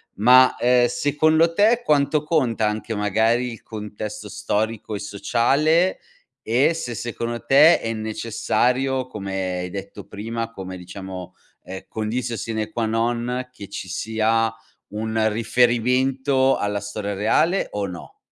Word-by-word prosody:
ma, 125 Hz, +5 st, +6 dB
ehm, 120 Hz, 0 st, +4 dB
secondo 155 Hz, +5 st, +2 dB
te 225 Hz, +6 st, +3 dB
quanto 150 Hz, 0 st, +2 dB
conta 130 Hz, -9 st, +1 dB
anche 110 Hz, +1 st, -3 dB
magari 110 Hz, +4 st, +1 dB
il 115 Hz, -, -10 dB
contesto 105 Hz, -1 st, -7 dB
storico 105 Hz, +1 st, -2 dB
e -, -, -4 dB
sociale, 130 Hz, -, +1 dB, 0.4 s
e 130 Hz, +9 st, +2 dB
se 125 Hz, -8 st, -5 dB
secondo 120 Hz, 0 st, -4 dB
te 150 Hz, +6 st, +6 dB
è 115 Hz, 0 st, -3 dB
necessario, 125 Hz, +4 st, -1 dB
come 95 Hz, -5 st, -4 dB
hai 90 Hz, -, -4 dB
detto 100 Hz, +1 st, -8 dB
prima, 115 Hz, +2 st, -5 dB
come 95 Hz, -3 st, -7 dB
diciamo, 95 Hz, 0 st, -8 dB, 0.3 s
ehm, 95 Hz, +1 st, -8 dB
conditio 115 Hz, +2 st, -3 dB
sine 110 Hz, -1 st, -4 dB
qua 115 Hz, -1 st, -1 dB
non 120 Hz, +3 st, -1 dB
che 100 Hz, -6 st, -11 dB
ci 95 Hz, -, -6 dB
sia 110 Hz, +3 st, 0 dB, 0.4 s
un 110 Hz, +1 st, -1 dB
riferimento 125 Hz, +4 st, +2 dB
alla 105 Hz, 0 st, -1 dB
storia 100 Hz, 0 st, -4 dB
reale 155 Hz, -, +1 dB
o 100 Hz, -1 st, -2 dB
no? 90 Hz, -2 st, -9 dB
115 Hz, 130 wpm, -22 LUFS, 105-130 Hz, 0.4 s, ma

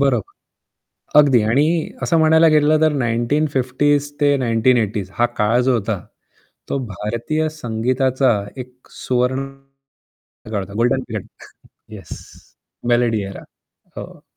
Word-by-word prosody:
बरोबर. 130 Hz, -7 st, 0 dB, 0.9 s
अगदी 135 Hz, -5 st, +5 dB
आणि 155 Hz, +6 st, +1 dB
असं 165 Hz, -, +2 dB
म्हणायला 160 Hz, +1 st, +5 dB
गेलं 155 Hz, 0 st, +3 dB
तर 155 Hz, -, +4 dB
1950s 140 Hz, +3 st, 0 dB
ते 145 Hz, -1 st, +4 dB
1980s 115 Hz, -5 st, +1 dB
हा 120 Hz, -, +4 dB
काळ 110 Hz, +3 st, +2 dB
जो 130 Hz, +1 st, +2 dB
होता, 105 Hz, -2 st, -3 dB, 0.7 s
तो 140 Hz, -, -1 dB
भारतीय 115 Hz, -, -3 dB
संगीताचा 130 Hz, -1 st, 0 dB, 0.2 s
एक 125 Hz, 0 st, -11 dB
सुवर्ण 130 Hz, +2 st, -1 dB, 1.1 s
काळ 105 Hz, -, -1 dB
होता. 100 Hz, +1 st, -11 dB
Golden 120 Hz, +4 st, +1 dB
period, 110 Hz, -5 st, -6 dB, 0.7 s
yes. -, -, -11 dB, 0.8 s
मेलडी 120 Hz, -3 st, +2 dB
ऐरा. 100 Hz, -, -9 dB, 0.5 s
हो. -, -, -9 dB
125 Hz, 115 wpm, -19 LUFS, 115-145 Hz, 1.1 s, अगदी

